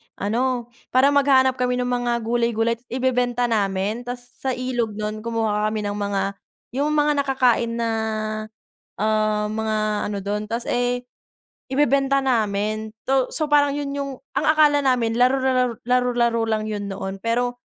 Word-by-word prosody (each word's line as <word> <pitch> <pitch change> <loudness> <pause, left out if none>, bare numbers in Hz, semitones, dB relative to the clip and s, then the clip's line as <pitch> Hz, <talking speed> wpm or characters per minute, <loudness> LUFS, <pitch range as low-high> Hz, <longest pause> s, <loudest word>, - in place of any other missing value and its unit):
ano 240 +3 -1 0.2
parang 265 +3 +4
maghahanap 265 -2 +3
kami 250 0 +1
ng - - -2
mga 240 0 -1
gulay-gulay 235 0 +1
ibebenta 250 -1 0
namin 210 0 -1
tas 245 0 -5 0.2
sa 260 -1 -1
ilog 245 -4 -2
non 215 0 -3
kumukuha 220 -2 0
kami 215 0 -2
ng 205 0 -2
mga 200 -1 -1 0.6
yung 300 +1 +1
mga 295 0 +3
nakakain 250 -4 +2
na 230 -1 -1 1.1
ah 215 0 +1
mga 220 0 -1 0.3
ano 205 - -3
dun 205 +2 -2
tas 230 +1 -2
eh 245 0 0 0.6
ibebenta 275 0 +3
namin 215 -3 0 0.2
to 265 -1 +2
so 310 - 0
parang 285 -1 +4
yun 285 -1 -3
yung 280 -1 -3 0.3
ang - - -1
akala 300 -2 +5
namin 245 -4 +1
laro-laro, 255 -2 +2
laro-laro 245 -2 +2
lang 215 -1 0
yun 205 -1 -4
noon. 195 0 -5
Pero 245 +1 0
240 Hz, 145 wpm, -22 LUFS, 215-260 Hz, 1.1 s, akala